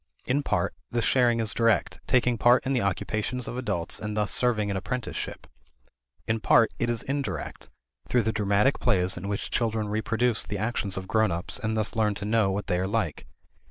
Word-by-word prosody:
In 135 Hz, +3 st, +1 dB
part, 105 Hz, -10 st, 0 dB, 0.2 s
this 120 Hz, -2 st, -1 dB
sharing 120 Hz, -3 st, +3 dB
is 110 Hz, -2 st, 0 dB
direct, 115 Hz, -2 st, +1 dB
taking 125 Hz, -1 st, +3 dB
part 120 Hz, +2 st, +5 dB
in 135 Hz, -, 0 dB
the 125 Hz, -, +1 dB
occupations 110 Hz, +5 st, -2 dB
of -, -, -5 dB
adults 90 Hz, -10 st, -3 dB
and 105 Hz, 0 st, -4 dB
thus 105 Hz, -1 st, +1 dB
serving 110 Hz, -5 st, +2 dB
an -, -, -2 dB
apprenticeship; 125 Hz, +3 st, -4 dB, 0.8 s
in 110 Hz, 0 st, 0 dB
part, 115 Hz, +1 st, +4 dB
it 120 Hz, -, 0 dB
is 120 Hz, -2 st, -1 dB
indirect, 140 Hz, +1 st, -4 dB, 0.4 s
through 120 Hz, +7 st, +2 dB
the 110 Hz, +1 st, 0 dB
dramatic 105 Hz, +5 st, +2 dB
plays 95 Hz, -5 st, +1 dB
in 90 Hz, +2 st, -6 dB
which 100 Hz, 0 st, -3 dB
children 110 Hz, -3 st, 0 dB
reproduce 115 Hz, +2 st, 0 dB
the 105 Hz, -, -4 dB
actions 105 Hz, -2 st, -1 dB
of 95 Hz, 0 st, -5 dB
grown 110 Hz, 0 st, +2 dB
ups 85 Hz, +2 st, -3 dB
and 110 Hz, 0 st, -2 dB
thus 110 Hz, 0 st, -1 dB
learn 105 Hz, -2 st, +1 dB
to 100 Hz, -, -5 dB
know 110 Hz, -2 st, +2 dB
what 100 Hz, +2 st, -2 dB
they 90 Hz, -, 0 dB
are 95 Hz, -, 0 dB
like. 110 Hz, +3 st, -2 dB
110 Hz, 195 wpm, -27 LUFS, 100-120 Hz, 0.8 s, part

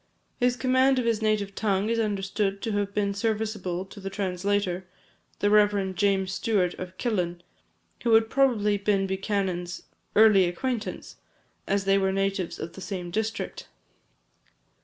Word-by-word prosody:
His 245 Hz, 0 st, +2 dB
command 260 Hz, +2 st, +3 dB
of 250 Hz, -, 0 dB
his 230 Hz, -2 st, +1 dB
native 215 Hz, -2 st, 0 dB
tongue 200 Hz, -1 st, 0 dB
is 230 Hz, -, +1 dB
understood 200 Hz, -1 st, -1 dB
to 225 Hz, -, -1 dB
have 205 Hz, -1 st, -1 dB
been 200 Hz, -1 st, 0 dB
serviceable 210 Hz, -4 st, -2 dB
to 200 Hz, +2 st, -12 dB
the 195 Hz, 0 st, -5 dB
translator, 190 Hz, -1 st, -1 dB, 0.5 s
the 205 Hz, -, +3 dB
Rev. 205 Hz, -2 st, +3 dB
James 195 Hz, -1 st, +1 dB
Stewart 195 Hz, -4 st, +1 dB
of 185 Hz, 0 st, -7 dB
Killin, 175 Hz, -7 st, -1 dB, 0.6 s
who 230 Hz, -2 st, +5 dB
had 225 Hz, 0 st, +4 dB
probably 225 Hz, -6 st, +2 dB
been 195 Hz, -1 st, +1 dB
Buchanan's 190 Hz, -2 st, -2 dB, 0.3 s
early 210 Hz, -3 st, +7 dB
acquaintance, 225 Hz, +6 st, -4 dB, 0.5 s
as 200 Hz, 0 st, 0 dB
they 195 Hz, 0 st, +4 dB
were 190 Hz, 0 st, +1 dB
natives 195 Hz, -2 st, -1 dB
of 165 Hz, -, -6 dB
the 190 Hz, -, -10 dB
same 180 Hz, -3 st, -5 dB
district. 220 Hz, +3 st, -3 dB
200 Hz, 145 wpm, -26 LUFS, 190-220 Hz, 0.6 s, early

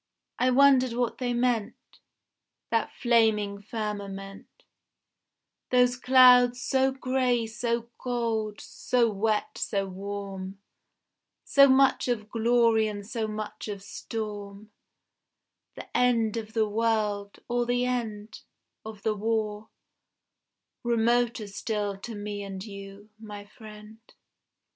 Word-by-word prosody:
I 255 Hz, -, +3 dB
wondered 260 Hz, -1 st, +5 dB
what 240 Hz, -1 st, -1 dB
they 250 Hz, -1 st, -1 dB
meant, 240 Hz, -3 st, 0 dB, 1.0 s
That 230 Hz, -1 st, 0 dB
flaming 220 Hz, -4 st, +2 dB
firmament, 200 Hz, -2 st, -6 dB, 1.2 s
Those 250 Hz, 0 st, +4 dB
clouds 250 Hz, -1 st, +6 dB
so 265 Hz, 0 st, +2 dB
grey 255 Hz, -3 st, 0 dB
so 235 Hz, +1 st, -2 dB
gold, 230 Hz, -4 st, -2 dB
so 240 Hz, -3 st, 0 dB
wet 210 Hz, +1 st, -1 dB
so 195 Hz, -1 st, -1 dB
warm, 195 Hz, 0 st, -6 dB, 0.9 s
So 275 Hz, 0 st, +6 dB
much 265 Hz, 0 st, +4 dB
of 215 Hz, -4 st, -2 dB
glory 230 Hz, -1 st, +3 dB
and 205 Hz, -1 st, -6 dB
so 225 Hz, 0 st, -3 dB
much 215 Hz, 0 st, -6 dB
of 200 Hz, -2 st, -6 dB
storm, 210 Hz, -1 st, -7 dB, 1.0 s
The -, -, -11 dB
end 235 Hz, -3 st, +2 dB
of 220 Hz, -1 st, -5 dB
the 220 Hz, -1 st, +2 dB
world, 210 Hz, -2 st, -1 dB
or 240 Hz, 0 st, 0 dB
the 245 Hz, 0 st, +1 dB
end 220 Hz, -4 st, -4 dB, 0.4 s
Of 215 Hz, -2 st, -10 dB
the 220 Hz, -, +1 dB
war 215 Hz, 0 st, -2 dB, 1.1 s
remoter 235 Hz, -1 st, +1 dB
still 205 Hz, 0 st, -3 dB
to 225 Hz, +2 st, -7 dB
me 205 Hz, 0 st, -5 dB
and 195 Hz, 0 st, -7 dB
you, 200 Hz, 0 st, -11 dB
my 210 Hz, -2 st, -9 dB
friend. 210 Hz, +1 st, -13 dB
220 Hz, 110 wpm, -27 LUFS, 205-240 Hz, 1.2 s, clouds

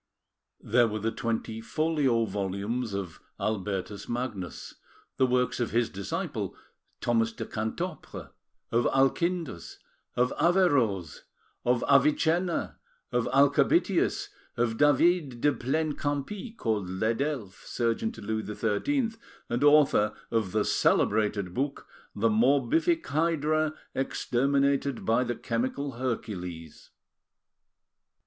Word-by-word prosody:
There 120 Hz, -2 st, +3 dB
were 110 Hz, -1 st, -3 dB
the 110 Hz, +2 st, -1 dB
twenty 115 Hz, -1 st, -3 dB
folio 140 Hz, -4 st, +1 dB
volumes 100 Hz, +3 st, -3 dB
of 95 Hz, -4 st, -5 dB, 0.2 s
Albertus 100 Hz, -1 st, -3 dB
Magnus; 120 Hz, -8 st, -4 dB, 0.4 s
the 130 Hz, -, +4 dB
works 125 Hz, 0 st, +1 dB
of 120 Hz, -, 0 dB
his 120 Hz, 0 st, +1 dB
disciple, 100 Hz, 0 st, -4 dB, 0.5 s
Thomas 115 Hz, -1 st, +2 dB
de -, -, -6 dB
Cantopre, 155 Hz, +11 st, -5 dB, 0.4 s
of 115 Hz, +1 st, +2 dB
Alchindus, 135 Hz, -, 0 dB, 0.4 s
of 125 Hz, +1 st, +2 dB
Averroes, 140 Hz, -, +2 dB, 0.4 s
of 120 Hz, 0 st, +2 dB
Avicenna, 160 Hz, +5 st, +2 dB, 0.3 s
of 120 Hz, -1 st, +1 dB
Alchabitius, 140 Hz, +1 st, +3 dB, 0.3 s
of 115 Hz, -1 st, 0 dB
David 145 Hz, -2 st, +3 dB
de 145 Hz, +4 st, +3 dB
Plaine 150 Hz, +6 st, -1 dB
Campy, 150 Hz, -, -4 dB
called 105 Hz, -5 st, -1 dB
L'Edelphe, 115 Hz, +2 st, -2 dB
surgeon 120 Hz, -, -1 dB
to -, -, -11 dB
Louis 110 Hz, +1 st, -2 dB
XIII 225 Hz, -, 0 dB, 0.4 s
and 120 Hz, +3 st, 0 dB
author 145 Hz, -8 st, +5 dB, 0.2 s
of 110 Hz, -5 st, 0 dB
the 110 Hz, +1 st, +1 dB
celebrated 105 Hz, -3 st, +1 dB
book 135 Hz, +5 st, -2 dB, 0.3 s
The 115 Hz, +3 st, +2 dB
Morbific 140 Hz, +8 st, +2 dB
Hydra 155 Hz, +1 st, +1 dB, 0.2 s
Exterminated 140 Hz, +1 st, 0 dB
by 115 Hz, +3 st, +3 dB
the 120 Hz, -1 st, -2 dB
Chemical 130 Hz, +4 st, -2 dB
Hercules. 90 Hz, -, -5 dB
120 Hz, 105 wpm, -28 LUFS, 110-145 Hz, 0.5 s, author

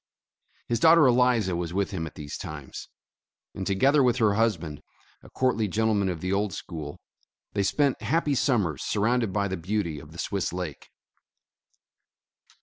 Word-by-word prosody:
His 115 Hz, -, 0 dB
daughter 165 Hz, +2 st, +7 dB
Eliza 120 Hz, -7 st, +3 dB
was 85 Hz, 0 st, -3 dB
with 100 Hz, +1 st, 0 dB
him 80 Hz, -4 st, -3 dB
at -, -, -12 dB
these 75 Hz, -1 st, -7 dB
times, 75 Hz, -3 st, -8 dB, 0.6 s
and 95 Hz, -, -5 dB
together 135 Hz, +9 st, +3 dB
with 125 Hz, -2 st, +3 dB
her 110 Hz, -4 st, +3 dB
husband, 85 Hz, -9 st, -1 dB, 0.4 s
a -, -, -15 dB
courtly 125 Hz, -4 st, +1 dB
gentleman 105 Hz, -1 st, +1 dB
of 85 Hz, -3 st, -4 dB
the 95 Hz, +1 st, -1 dB
old 100 Hz, -1 st, 0 dB
school, 80 Hz, -4 st, -7 dB, 0.5 s
they 100 Hz, -, 0 dB
spent 140 Hz, +5 st, +1 dB
happy 145 Hz, +6 st, +1 dB
summers 105 Hz, -, +1 dB
surrounded 115 Hz, +1 st, +1 dB
by 100 Hz, +1 st, 0 dB
the 95 Hz, -1 st, -3 dB
beauty 85 Hz, -3 st, -2 dB
of 75 Hz, +2 st, -13 dB
the 85 Hz, -, -12 dB
Swiss 100 Hz, 0 st, -2 dB
Lake. 90 Hz, -5 st, -6 dB
100 Hz, 155 wpm, -26 LUFS, 85-120 Hz, 0.6 s, daughter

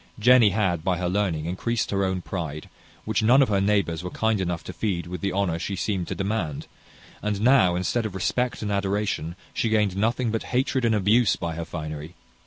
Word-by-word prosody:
Jenny 120 Hz, 0 st, +6 dB
had, 90 Hz, -5 st, 0 dB
by 90 Hz, 0 st, +1 dB
her 90 Hz, 0 st, -1 dB
learning, 90 Hz, -5 st, 0 dB
increased 105 Hz, +7 st, -2 dB
her 100 Hz, -1 st, +1 dB
own 95 Hz, -2 st, -1 dB
pride, 80 Hz, -5 st, -5 dB, 0.4 s
which 110 Hz, 0 st, 0 dB
none 125 Hz, +5 st, +6 dB
of 130 Hz, -, -1 dB
her 100 Hz, -2 st, +2 dB
neighbours 100 Hz, -5 st, +1 dB
were 90 Hz, -, -4 dB
kind 110 Hz, +1 st, 0 dB
enough 85 Hz, -2 st, -2 dB
to 90 Hz, -, -7 dB
feed 85 Hz, -1 st, -2 dB
with 90 Hz, -1 st, -6 dB
the 100 Hz, -, -1 dB
honour 90 Hz, -3 st, 0 dB
she 100 Hz, +3 st, -3 dB
seemed 95 Hz, -2 st, -2 dB
to -, -, -3 dB
demand; 95 Hz, -7 st, -2 dB, 0.6 s
and 105 Hz, -1 st, -1 dB
now, 110 Hz, -6 st, +4 dB
instead 110 Hz, +6 st, 0 dB
of 95 Hz, -, -10 dB
respect 120 Hz, +6 st, -1 dB
and 105 Hz, -, -2 dB
adoration, 100 Hz, -4 st, -1 dB, 0.2 s
she 115 Hz, -, 0 dB
gained 105 Hz, -4 st, +2 dB
nothing 115 Hz, +3 st, 0 dB
but 115 Hz, -, -1 dB, 0.2 s
hatred 130 Hz, -1 st, +1 dB
and 115 Hz, -1 st, +3 dB
abuse 105 Hz, +3 st, +3 dB
by 85 Hz, -1 st, -4 dB
her 85 Hz, +1 st, -5 dB
finery. 80 Hz, 0 st, -6 dB
100 Hz, 205 wpm, -25 LUFS, 90-110 Hz, 0.6 s, Jenny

